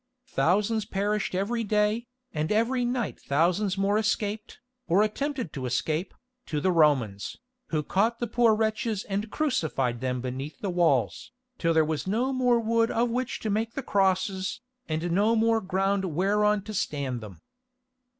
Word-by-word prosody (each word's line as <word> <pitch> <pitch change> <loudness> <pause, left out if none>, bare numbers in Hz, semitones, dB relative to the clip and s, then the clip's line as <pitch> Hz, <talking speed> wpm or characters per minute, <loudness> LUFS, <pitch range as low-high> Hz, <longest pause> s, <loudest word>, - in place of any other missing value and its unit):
Thousands 210 +2 +2
perished 205 -1 -1
every 225 +5 0
day, 210 +2 +1 0.3
and 155 +3 -1
every 235 +4 +2
night 240 -3 -2
thousands 180 +7 +1
more 200 +2 +2
escaped, 215 -1 -2 0.3
or 185 +5 +4
attempted 255 - -2
to 130 -3 -4
escape, 155 +8 -1 0.3
to 150 - -1
the 185 +5 +2
Romans, 135 - +2 0.3
who 155 -2 -1
caught 220 +9 +1
the 240 - -2
poor 230 -1 +3
wretches 220 -1 -1
and 205 +2 -3
crucified 210 - -1
them 125 -1 -1
beneath 130 +4 -5
the 195 - -2
walls, 165 - +1 0.3
till 165 - +2
there 160 -1 +5
was 155 +2 -3
no 240 +7 0
more 250 -2 +3
wood 230 0 +2
of 235 +1 +1
which 250 0 -2
to 215 - -1
make 220 +2 -1
the 275 - -3
crosses, 190 0 0 0.3
and 160 +2 -1
no 210 +6 +3
more 225 0 +3
ground 195 +1 0
whereon 200 +4 +2
to 215 - -7
stand 140 - -2
them. 100 -6 -10
200 Hz, 160 wpm, -27 LUFS, 160-225 Hz, 0.3 s, there